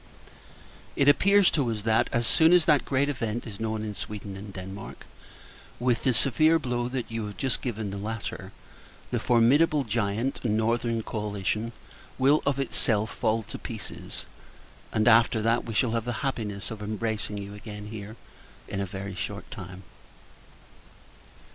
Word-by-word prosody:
It 140 - +2
appears 200 +6 +6
to 140 -7 +1
us 110 -2 -3
that, 110 0 +3
as 120 0 +1
soon 160 +8 +5
as 180 -2 +6
that 150 -5 +4
great 140 +1 +1
event 120 -5 -2
is 110 -3 -8
known 110 -1 -2
in 105 -1 -4
Sweden 100 0 -6
and 100 +1 -8
Denmark, 95 +1 -8 0.7
with 120 -1 +1
the 130 - +5
severe 155 +6 +4
blow 125 -5 -2 0.2
you 115 -2 -4
have 105 -2 -9
just 130 -3 0
given 110 -5 -3
the 100 - -5
latter, 110 +1 -5 0.6
the - - +1
formidable 140 +6 +4
giant, 115 +2 -1
Northern 115 +1 +1
Coalition, 105 +1 -2 0.5
will 140 +4 +4
of 140 -1 +2
itself 110 -5 0
fall 115 -1 0
to - - -8
pieces; - - -7 0.7
and 110 -1 +1
that 115 0 +4
we 115 - -5
shall 115 +1 +2
have 115 -1 -1
the 120 - -2
happiness 105 -7 -3
of 110 -1 -6
embracing 105 0 -3
you 100 0 -6
again 105 0 -8
here, 110 0 -7 0.5
in 100 - -3
a 100 - -2
very 95 +1 -6
short 90 - -6
time. 95 +1 -8
110 Hz, 155 wpm, -27 LUFS, 105-125 Hz, 0.7 s, appears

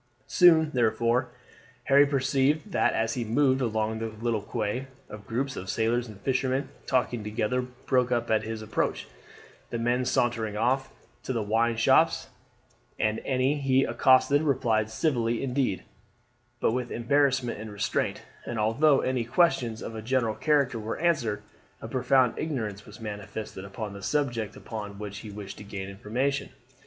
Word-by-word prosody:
Soon, 160 -3 +5
therefore, 120 +1 +2 0.5
Harry 140 +1 +5
perceived 140 +6 +1
that - - +2
as 115 0 0
he 125 - -2
moved 130 +4 +2
along 110 -2 -1
the 115 0 -3
quay 110 - -13
little 115 +2 -3
groups 130 +3 -2
of 95 - -6
sailors 120 +2 0
and 105 -3 -11
fishermen 130 +1 0 0.2
talking 125 -3 0
together 105 +4 -1
broke 125 0 -1
up 120 -1 0
at 110 -1 +3
his 110 0 -5
approach, 110 - -2 0.6
the - - -3
men 120 +2 +1
sauntering 115 -4 0
off 130 +4 +1 0.3
to - - -4
the 115 -4 -1
wine 115 +2 +1
shops, 115 - +3 0.7
and 110 +1 0
any 135 +2 +1
he 135 -1 +3
accosted 135 +2 +4
replied 120 -7 +1
civilly 120 -1 0
indeed, 125 -6 0 0.8
but - - +2
with 125 0 -2
embarrassment 130 -1 +1
and 110 -1 -7
restraint; 100 0 -1 0.2
and 120 - -5
although 125 +7 +3
any 130 -2 0
questions 120 -4 +1
of 115 - -6
a 110 - -5
general 115 -1 +1
character 140 -4 +1
were 110 +1 -4
answered, 140 -11 0 0.4
a - - -7
profound 130 -1 +3
ignorance 110 -10 -3
was 105 +2 -12
manifested 105 -2 -6
upon 100 +1 -6
the 100 - -9
subject 120 -3 -1
upon 105 -3 -7
which 100 -1 -6
he 110 - -9
wished 100 -1 -8
to - - -8
gain 100 -1 -6
information. 120 +8 -2
120 Hz, 155 wpm, -27 LUFS, 110-130 Hz, 0.8 s, Soon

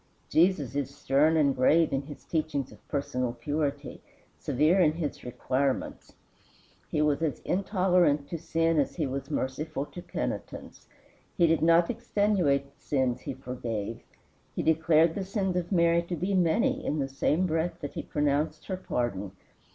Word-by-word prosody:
Jesus 160 -6 +2
is 140 -2 -1
stern 150 +3 +3
and 140 -3 +3
grave 155 +6 +3
in 135 - +1
his 145 - -10
teachings 155 -5 -2
of - - -18
personal 125 -4 -2
purity, 145 0 -3 0.3
severe 155 +8 +2
in 155 -4 +4
his 160 -3 -4
requirements. 130 +2 -2 0.7
He 150 - +1
was 150 0 +1
as 160 -4 0
intolerant 180 -6 +2
to 165 - -4
sin 165 0 +1
as 140 - 0
he 160 - -1
was 135 0 -4
merciful 140 +2 -3
to 175 - -10
penitence. - - -6 0.5
He 175 - +5
did 165 -1 +2
not 170 +3 +4
extenuate 200 - +1
the - - -35
sins 130 -4 0
he - - -5
forgave. 115 -4 -5 0.5
He - - -1
declared 160 0 +4
the 195 - -3
sins 190 -1 -1
of 180 0 -2
Mary 170 -2 +4
to 170 +1 -4
be 180 +5 -2
many 225 - +2
in 150 - -1
the 140 -2 -1
same 150 +6 +1
breath 165 0 -1
that 145 - -5
he - - -4
pronounced 150 +1 -1
her 185 - -3
pardon. 105 - -3
155 Hz, 160 wpm, -28 LUFS, 140-170 Hz, 0.7 s, He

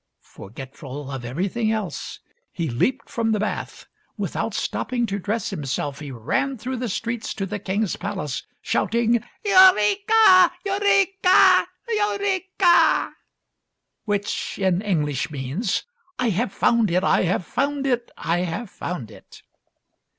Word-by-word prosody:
" - - -57 0.2
Forgetful 135 +5 -9
of 135 -2 -5
everything 195 - -1
else 215 -3 -4 0.3
he 170 -3 -3
leaped 195 - -1
from 225 -3 -1
the 210 - 0
bath. 215 - -4 0.3
Without - - -3
stopping 245 -2 -1
to 200 -2 -3
dress 210 +4 -2
himself, 140 0 -3
he 150 -2 -7
ran 135 - -2
through 255 +4 -4
the 245 -1 -3
streets 230 +3 -3
to 195 - -2
the 205 +2 -5
king's 195 +1 -1
palace 150 -8 -4 0.2
shouting, 235 0 +1
" - - -36
Eureka! 375 - +6
Eureka! 390 -1 +4 0.2
Eureka! 400 -4 +2 0.4
" - - -56
which 205 -1 -2
in 190 -2 +1
English 150 -9 -1
means, 150 - -2 0.2
" - - -42
I 250 -2 +1
have 205 +3 -1
found 230 -1 +2
it! 180 +2 +1
I - - +3
have 180 0 0
found 280 +5 -1
it! 245 -3 0
I 170 +2 -1
have 180 +5 -4
found 140 - -6
it!" - - -16
215 Hz, 140 wpm, -23 LUFS, 170-275 Hz, 0.4 s, Eureka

